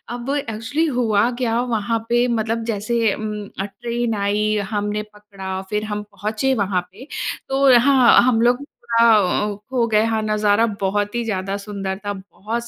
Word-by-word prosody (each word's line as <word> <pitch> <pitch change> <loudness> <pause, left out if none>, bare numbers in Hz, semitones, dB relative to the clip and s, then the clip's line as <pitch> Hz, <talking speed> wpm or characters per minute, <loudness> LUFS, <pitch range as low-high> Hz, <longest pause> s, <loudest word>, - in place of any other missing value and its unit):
अब 245 +2 -6
एक्चुअली 230 +4 -2
हुआ 220 -1 +2
क्या 230 -1 +1
वहाँ 225 +1 0
पे 240 +1 +3
मतलब 225 +1 -1
जैसे 220 +1 0
उम, 215 -1 -4 0.3
अ, 195 - -1
ट्रेन 235 +3 -3
आई, 210 +1 +1 0.2
हमने 210 0 -1
पकड़ा 195 -2 -7
फिर 210 0 -1
हम 210 0 -3
पहुँचे 215 +6 -1
वहाँ 185 -2 0
पे। 230 +9 -13 0.4
तो 270 -2 +5
हाँ, 260 -1 +6
हम 240 -2 +3
लोग 245 +1 +4
पूरा - - -52 0.5
थोड़ा 205 +3 0
अ, - - -8
खो 250 -3 +1
गए। 215 -1 +3
हाँ, 225 -1 0
नज़ारा 215 +1 +2 0.2
बहुत 205 +2 -1
ही 240 - 0
ज़्यादा 195 -2 -2
सुंदर 200 -2 -5
था, 205 - -1
बहुत 210 +4 -6
215 Hz, 170 wpm, -21 LUFS, 205-235 Hz, 0.5 s, हाँ